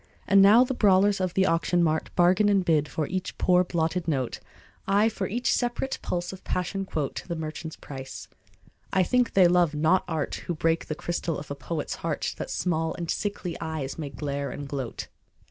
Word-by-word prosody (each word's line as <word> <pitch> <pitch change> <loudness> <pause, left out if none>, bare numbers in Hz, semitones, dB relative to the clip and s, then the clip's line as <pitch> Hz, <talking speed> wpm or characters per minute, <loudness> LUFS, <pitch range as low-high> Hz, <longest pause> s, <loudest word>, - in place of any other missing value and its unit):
And 200 -1 +6
now 210 +5 +8
the 260 - -2
brawlers 200 -3 +4
of 185 -1 -1
the 190 - +4
auction 175 0 +2
mart 160 -1 0
Bargain 185 +4 +4
and 195 -3 +2
bid 150 -3 +2
for 155 - -2
each 185 +3 -4
poor 180 0 +4
blotted 170 0 -1
note, 135 -6 -1 0.5
Ay! 205 +3 +4
for 195 -3 -3
each 240 +5 0
separate 245 +2 -1
pulse 175 +1 -3
of 190 - -11
passion 195 +2 -2
quote 150 -6 -3
The 170 - -3
merchant's 160 0 -6
price. 135 -2 -8 0.6
I 190 - +3
think 250 +6 +1
they 185 -2 +7
love 175 -3 +3
not 160 +5 +3
art 160 -3 -2
Who 175 - -1
break 165 +1 0
the 155 - -3
crystal 170 0 -3
of 140 - -8
a - - -3
poet's 150 +1 -4
heart 165 -3 -2
That - - -4
small 160 -2 -1
and 170 -1 -3
sickly 200 -4 -3
eyes 155 -3 -4
may 150 -3 -4
glare 140 0 -4
and 145 -1 -6
gloat. 135 -4 -5
175 Hz, 195 wpm, -26 LUFS, 155-190 Hz, 0.6 s, now